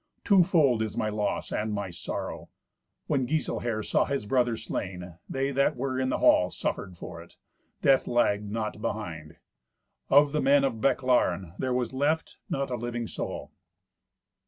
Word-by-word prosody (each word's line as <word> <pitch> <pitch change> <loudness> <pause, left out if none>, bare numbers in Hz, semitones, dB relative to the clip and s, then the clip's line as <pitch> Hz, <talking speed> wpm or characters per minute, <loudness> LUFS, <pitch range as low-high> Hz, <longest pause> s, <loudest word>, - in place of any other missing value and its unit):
Twofold 165 - +4
is 110 -2 -3
my 110 - 0
loss 105 -1 -2
and 110 +1 -1
my 100 -3 -3
sorrow." 85 - -5 0.6
When 135 -4 0
Giselher 120 -7 -1
saw - - +2
his 140 -6 -2
brother 120 0 +1
slain, 90 -5 -5
they 135 +1 -1
that 140 0 +2
were 130 +1 -2
in 130 0 0
the - - 0
hall - - +5
suffered 95 -3 -4
for 85 0 -8
it. 85 - -17 0.5
Death 135 -1 +4
lagged 105 -4 +1
not 110 0 -3
behind. 80 -9 -5 0.7
Of 145 +1 +6
the 150 - 0
men 140 0 +5
of 120 -5 -1
Bechlaren 115 -10 +2
there 130 - -1
was 125 -1 -1
left 145 +4 0
not 135 -1 -2
a 125 - -1
living 120 0 -3
soul. - - -5
120 Hz, 160 wpm, -28 LUFS, 105-135 Hz, 0.7 s, Of